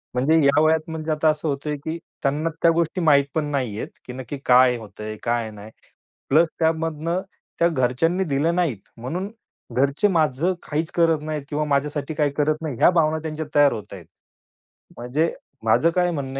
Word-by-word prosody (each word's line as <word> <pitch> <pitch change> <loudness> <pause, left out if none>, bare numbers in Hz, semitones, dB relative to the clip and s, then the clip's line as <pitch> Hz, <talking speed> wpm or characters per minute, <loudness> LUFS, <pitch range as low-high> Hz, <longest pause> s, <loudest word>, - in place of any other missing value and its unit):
म्हणजे 140 +6 +3
या 140 +2 +4
वयात 160 0 +2
म्हणजे 160 0 -4
आता 155 +1 +1
असं 155 +1 -1
होतंय, 145 +1 -2
की 160 +3 -5 0.3
त्यांना 150 +4 0
त्या 170 - +5
गोष्टी 170 +2 0
माहीत 145 -3 +5
पण 155 -2 +1
नाहीयेत, 125 -7 -2 0.2
की 125 - -8
नक्की 130 +2 -6
काय 125 0 +6
होतंय, 110 0 -8
काय 115 -2 0
नाही? 105 +1 -11 0.6
प्लस 160 +4 +5
त्यामधनं 165 +2 0 0.4
त्या 170 - +5
घरच्यांनी 160 +6 +1
दिल्या 150 +1 +1
नाहीत, 165 - -2
म्हणून 175 - -4 0.5
घरचे 140 +9 +2
माझं 160 0 +1
काहीच 155 +2 -2
करत 165 -3 +2
नाहीत 155 -2 -4
किंवा 150 +1 -1
माझ्यासाठी 145 +1 -1
काही 150 -1 +1
करत 155 +2 +1
नाही, 145 -7 -4
या - - +7
भावना 160 -2 +2
त्यांच्या 155 0 -4
तयार 145 -1 +6
होताहेत. 100 -5 -8 0.9
म्हणजे 140 +8 -1 0.3
माझं 115 +9 +4
काय 180 -1 +2
म्हणणं 135 -3 -4
150 Hz, 170 wpm, -23 LUFS, 135-160 Hz, 0.9 s, या